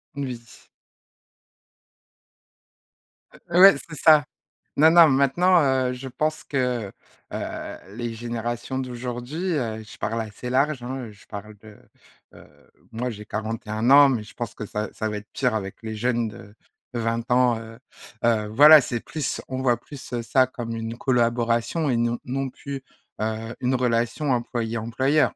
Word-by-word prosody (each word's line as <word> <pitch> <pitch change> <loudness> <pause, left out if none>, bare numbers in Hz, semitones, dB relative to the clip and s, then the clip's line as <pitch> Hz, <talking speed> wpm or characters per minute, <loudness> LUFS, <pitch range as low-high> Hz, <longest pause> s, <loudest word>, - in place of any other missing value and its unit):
N 140 - -3
oui. 120 -3 -10 2.8
Ouais, 185 +2 +8
c'est 150 - -8
ça. 155 -1 +6 0.5
Non, 155 +2 +6
non, 170 -1 +8
maintenant, 150 +7 +4
heu, 130 -2 +1
je 130 +1 -7
pense 155 +4 -2
que, 125 -7 -1 0.4
heu, - - -5 0.2
les 120 -1 -4
générations 120 +2 -4
d'aujourd'hui, 125 +7 -4
heu, 110 -6 -2
je 105 - -13
parle 115 0 -2
assez 110 +3 -7
large, 135 +1 +1
hein, 130 0 -5
heu, - - -11
je 105 - -19
parle 105 +1 -8
de, 105 -1 -14 0.6
heu, - - -15 0.4
moi, 120 +3 -3
j'ai 105 -1 -9
41 110 +1 -3
ans, 140 0 +9
mais 115 -5 -1
je 105 - -14
pense 120 - -6
que 105 - -6
ça, 105 +1 -4
ça 110 -1 -3
va 105 - -3
être 105 - -11
pire 125 -4 0
avec 95 -2 -4
les 110 -1 -5
jeunes 120 0 0
de 105 -2 -11 0.4
de - - -1
20 115 0 -1
ans, 125 -2 +4
heu 115 +1 -11 0.4
heu, 110 -2 +2
voilà, 150 +7 +9
c'est 120 -3 -2
plus 150 +1 -4
on 130 0 -4
voit 120 -2 +3
plus, 140 -3 -11
heu, 120 - -1
ça 130 +3 +3
comme 120 -2 -6
une 115 0 -4
collaboration 120 +4 +1
et 125 - +1
non 120 0 0
non 135 +1 -3
plus, 140 -2 -7 0.4
heu, 110 +1 -3
une 130 +1 +1
relation 120 +3 0
employé 115 -2 -1
employeur. 130 +7 +1
120 Hz, 165 wpm, -24 LUFS, 115-135 Hz, 2.8 s, ans